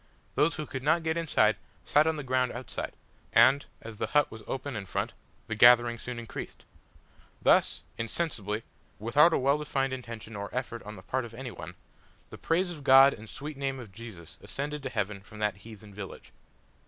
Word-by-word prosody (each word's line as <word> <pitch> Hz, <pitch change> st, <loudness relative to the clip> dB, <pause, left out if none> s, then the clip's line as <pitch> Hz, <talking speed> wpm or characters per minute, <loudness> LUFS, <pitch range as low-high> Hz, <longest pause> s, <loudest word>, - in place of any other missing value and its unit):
Those 165 Hz, +3 st, +2 dB
who 155 Hz, -, -4 dB
could 130 Hz, -2 st, -5 dB
not 155 Hz, +4 st, +2 dB
get 160 Hz, 0 st, 0 dB
inside 110 Hz, -11 st, +3 dB, 0.3 s
sat 150 Hz, +2 st, +4 dB
on 160 Hz, -, +2 dB
the 150 Hz, -, -5 dB
ground 130 Hz, -1 st, +1 dB
outside, 125 Hz, +2 st, -5 dB, 0.4 s
and, 130 Hz, +5 st, +6 dB, 0.2 s
as 115 Hz, -1 st, -9 dB
the -, -, -2 dB
hut 150 Hz, -1 st, +3 dB
was 110 Hz, -, -9 dB
open 135 Hz, 0 st, -4 dB
in 100 Hz, -3 st, -5 dB
front, -, -, -2 dB, 0.3 s
the 110 Hz, -, -4 dB
gathering 120 Hz, +1 st, +6 dB
soon 125 Hz, +1 st, -6 dB
increased. 120 Hz, -1 st, -7 dB, 0.7 s
Thus, -, -, +3 dB, 0.2 s
insensibly, 115 Hz, -, -2 dB, 0.3 s
without 125 Hz, +10 st, +5 dB
a -, -, +3 dB
well 140 Hz, +3 st, +2 dB
defined 135 Hz, -3 st, -1 dB
intention 115 Hz, -3 st, -7 dB
or 100 Hz, 0 st, -5 dB
effort 120 Hz, -2 st, -3 dB
on 105 Hz, +1 st, -8 dB
the -, -, -12 dB
part 130 Hz, 0 st, -1 dB
of 115 Hz, -1 st, -9 dB
any 125 Hz, 0 st, -6 dB
one, 85 Hz, -3 st, -9 dB, 0.6 s
the -, -, -10 dB
praise 175 Hz, +2 st, +1 dB
of 155 Hz, -5 st, -8 dB
God 135 Hz, 0 st, +8 dB
and 110 Hz, -, -10 dB
the -, -, -16 dB
sweet 145 Hz, +5 st, -7 dB
name 135 Hz, -1 st, -2 dB
of 115 Hz, -5 st, -10 dB
Jesus 95 Hz, -5 st, -11 dB
ascended 145 Hz, +1 st, -4 dB
to 135 Hz, -, -4 dB
heaven 105 Hz, -3 st, -2 dB
from 105 Hz, +2 st, -14 dB
that 105 Hz, -2 st, 0 dB
heathen 105 Hz, 0 st, -12 dB
village. 100 Hz, -1 st, -9 dB
125 Hz, 195 wpm, -29 LUFS, 110-140 Hz, 0.7 s, God